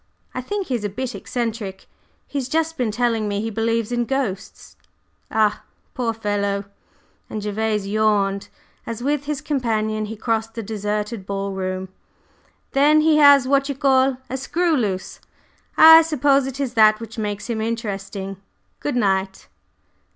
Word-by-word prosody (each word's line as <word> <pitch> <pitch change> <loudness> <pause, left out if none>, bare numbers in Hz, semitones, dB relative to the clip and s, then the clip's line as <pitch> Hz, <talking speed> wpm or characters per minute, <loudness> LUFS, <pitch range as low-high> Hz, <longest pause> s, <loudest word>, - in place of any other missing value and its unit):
I 255 - -3
think 400 +9 -3
he 265 - -4
is 235 -4 -2
a 205 - -1
bit 250 +5 -4
eccentric. 225 -5 -4 0.4
He's 270 -3 -4
just 325 +2 0
been 245 -6 -1
telling 230 -1 0
me 205 -1 -1
he 225 +2 -3
believes 230 +1 -1
in 240 0 0
ghosts." 225 -7 -4 0.5
"Ah, 215 -1 +1 0.3
poor 240 -2 -1
fellow!" 205 -2 -2 0.6
and 215 - -4
Gervase 210 0 -1
yawned 200 -1 +1 0.4
as, 230 +1 -5
with 290 +1 0
his 295 -1 -3
companion, 220 -6 -1
he 220 +1 -6
crossed 225 0 -2
the 230 - -4
deserted 210 0 -3
ball 195 0 -3
room. 185 0 -3 0.8
"Then 295 +3 +4
he 310 0 +4
has 285 -3 +7
what 275 +1 +2
you 280 - -2
call 265 -1 +3
a 265 - -4
screw 335 +5 0
loose. 200 -8 -2 0.6
I 320 +1 +10
suppose 285 -4 +2
it 270 +1 -6
is 265 -4 -2
that 215 -2 +5
which 225 0 -8
makes 205 -1 -3
him 230 -2 -2
interesting. 200 -4 -4 0.4
Good 290 - -3
night!" 190 -4 0
225 Hz, 155 wpm, -22 LUFS, 205-270 Hz, 0.8 s, I